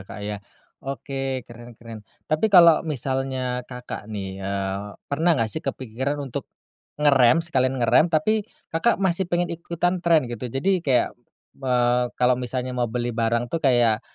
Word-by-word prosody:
Kak -, -, -8 dB
ya. 105 Hz, -1 st, -4 dB, 0.4 s
Oke 135 Hz, -2 st, -4 dB
keren 120 Hz, -1 st, -13 dB
keren 115 Hz, -1 st, -10 dB, 0.2 s
tapi 155 Hz, +8 st, +1 dB
kalau 170 Hz, -5 st, +7 dB
misalnya 130 Hz, -1 st, -2 dB
Kakak 125 Hz, -4 st, -8 dB
nih, 95 Hz, -2 st, -6 dB
eee, 100 Hz, +1 st, -3 dB
pernah 160 Hz, +5 st, +1 dB
gak 115 Hz, -3 st, 0 dB
sih 160 Hz, -, -3 dB
kepikiran 130 Hz, -1 st, -3 dB
untuk, 135 Hz, -, -6 dB, 0.5 s
ngerem 145 Hz, +1 st, +4 dB
sekalian 130 Hz, -5 st, +1 dB
ngerem 125 Hz, +7 st, +4 dB
tapi 205 Hz, +7 st, +1 dB, 0.2 s
Kakak 165 Hz, +9 st, +2 dB
masih 190 Hz, -1 st, 0 dB
pengen 175 Hz, 0 st, 0 dB
ikutan 170 Hz, +2 st, -2 dB
trend 165 Hz, -4 st, +3 dB
gitu 120 Hz, +2 st, -5 dB
jadi 135 Hz, +11 st, -1 dB
kayak, 130 Hz, -7 st, +2 dB, 0.5 s
eee, 125 Hz, -1 st, +2 dB
kalau 125 Hz, 0 st, +3 dB
misalnya 125 Hz, +1 st, -3 dB
mau 125 Hz, -1 st, -1 dB
beli 120 Hz, +1 st, -2 dB
barang 115 Hz, +1 st, -1 dB
tuh 165 Hz, -, -1 dB
kayak, 120 Hz, -5 st, +3 dB
130 Hz, 155 wpm, -24 LUFS, 120-160 Hz, 0.5 s, kalau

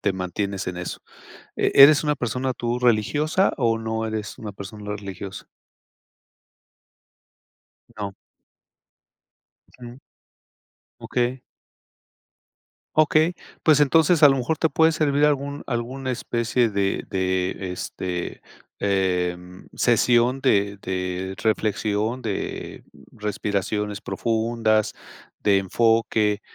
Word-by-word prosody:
te 100 Hz, -, +1 dB
mantienes 95 Hz, +1 st, -3 dB
en 90 Hz, -, -5 dB
eso. 90 Hz, 0 st, -5 dB, 0.6 s
¿E -, -, +1 dB
eres 145 Hz, +2 st, +9 dB
una 150 Hz, -1 st, +1 dB
persona 125 Hz, +2 st, -2 dB
tú 120 Hz, +1 st, -2 dB
religiosa 145 Hz, -, +2 dB
o 115 Hz, -3 st, +1 dB
no 110 Hz, 0 st, -3 dB
eres 110 Hz, -1 st, -5 dB
una 110 Hz, -, -6 dB
persona 105 Hz, +1 st, -8 dB
religiosa? 100 Hz, -1 st, -8 dB, 2.5 s
No. 100 Hz, -2 st, -4 dB, 1.7 s
Ujú. 120 Hz, +2 st, -10 dB, 1.0 s
Okey. 125 Hz, +1 st, -1 dB, 1.6 s
Okey. 155 Hz, +2 st, +3 dB, 0.3 s
Pues, 155 Hz, -3 st, +5 dB
entonces, 160 Hz, +3 st, +4 dB
a -, -, +10 dB
lo 135 Hz, -, +3 dB
mejor 130 Hz, +5 st, -1 dB
te 160 Hz, -, +2 dB
puede 160 Hz, +3 st, +4 dB
servir 150 Hz, -2 st, +1 dB
algún 140 Hz, -1 st, 0 dB
alguna 130 Hz, +2 st, -3 dB
especie 120 Hz, -1 st, 0 dB
de 100 Hz, -1 st, -1 dB
de, 95 Hz, 0 st, -1 dB
este, 90 Hz, 0 st, -5 dB, 0.4 s
eh, 90 Hz, -3 st, +1 dB, 0.4 s
sesión 120 Hz, +2 st, +3 dB
de 100 Hz, -6 st, +2 dB
de 95 Hz, 0 st, -3 dB
reflexión, 110 Hz, +2 st, 0 dB
de 110 Hz, -5 st, -5 dB, 0.3 s
respiraciones 105 Hz, 0 st, -2 dB
profundas, 110 Hz, -1 st, 0 dB, 0.4 s
de 100 Hz, -2 st, +3 dB
enfoque, 110 Hz, +1 st, +1 dB
110 Hz, 100 wpm, -23 LUFS, 100-130 Hz, 2.5 s, a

